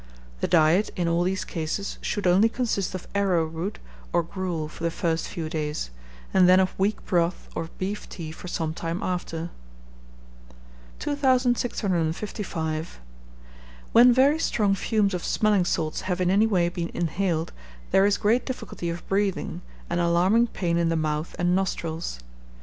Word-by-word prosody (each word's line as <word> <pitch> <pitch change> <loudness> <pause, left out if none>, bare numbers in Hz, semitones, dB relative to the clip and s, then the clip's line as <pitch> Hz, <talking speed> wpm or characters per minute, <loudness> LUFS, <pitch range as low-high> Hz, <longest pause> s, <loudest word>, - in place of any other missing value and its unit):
The - - 0
diet 170 +4 +4
in 175 -3 0
all 170 +1 +2
these 185 +2 0
cases 165 +4 -3
should 205 - -2
only 190 +5 +5
consist 225 -6 -1
of 185 - -7
arrowroot 180 -1 0 0.3
or 175 0 +2
gruel 170 -3 -3
for 155 - -10
the 170 - +2
first 165 -1 -1
few 165 -2 -4
days, 150 - -3 0.4
and 185 -1 +6
then 185 +1 +7
of 185 0 +2
weak 205 +2 0
broth 170 -1 0
or 165 - -4
beef 200 +3 -4
tea 160 -4 -6
for 170 - -9
some 160 -2 -2
time 170 +5 -4
after. 175 -2 -3 1.5
2655. 210 - -1 0.9
When 245 +2 +8
very 275 +5 +4
strong 210 -10 +2
fumes 205 0 +1
of 180 - -3
smelling 210 -4 +2
salts 155 -3 -1
have 185 -1 -2
in 180 0 +2
any 210 +3 +4
way 180 -5 +2
been 175 -1 -3
inhaled, 170 -1 -1 0.4
there 195 +1 +5
is 205 0 +2
great 225 +4 +2
difficulty 210 -8 -5
of 170 0 -6
breathing, 195 -3 -1 0.3
and 175 - -1
alarming 180 +7 +3
pain 170 -6 -1
in 170 -1 +2
the 165 - +1
mouth 155 0 -2
and 175 0 +2
nostrils. 170 - -2
180 Hz, 155 wpm, -25 LUFS, 165-200 Hz, 1.5 s, When